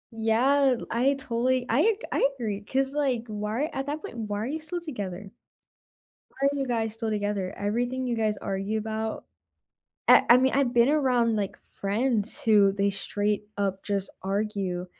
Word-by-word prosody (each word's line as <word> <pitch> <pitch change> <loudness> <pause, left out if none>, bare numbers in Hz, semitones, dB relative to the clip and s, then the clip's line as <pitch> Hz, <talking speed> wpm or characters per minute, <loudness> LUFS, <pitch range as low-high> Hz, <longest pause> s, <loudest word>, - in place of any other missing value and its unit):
Yeah, 250 +5 +3
I 255 +4 +2
totally 255 0 0
I 320 - +3 0.2
I - - +3
agree, 215 -6 -3
'cause 270 +4 0
like, 270 -6 0
why 215 +6 -2
at 270 - -3
that 295 +2 -4
point, 235 - -8
why 210 -2 -3
are - - -2
you 300 +6 -3
still 345 +3 -5
together? 200 - -6 1.0
Why 275 - -2
are - - -3
you 270 - -1
guys 225 -2 -1
still 225 -1 -3
together? 205 -3 -2
Everything 245 +5 -1
you 245 - 0
guys 215 -2 0
argue 195 +3 -2
about 220 0 -3 0.8
I - - +8
I 240 - +10
mean, 260 +1 +3
I've 270 -3 +2
been 240 0 +4
around, 250 -6 +2
like, 205 -3 -2 0.2
friends 215 +2 0
who 210 -3 +5
they 200 0 +1
straight 205 +1 -1
up 195 -1 -1
just 200 -2 -2
argue. 195 -2 -2
225 Hz, 170 wpm, -27 LUFS, 205-260 Hz, 1.0 s, I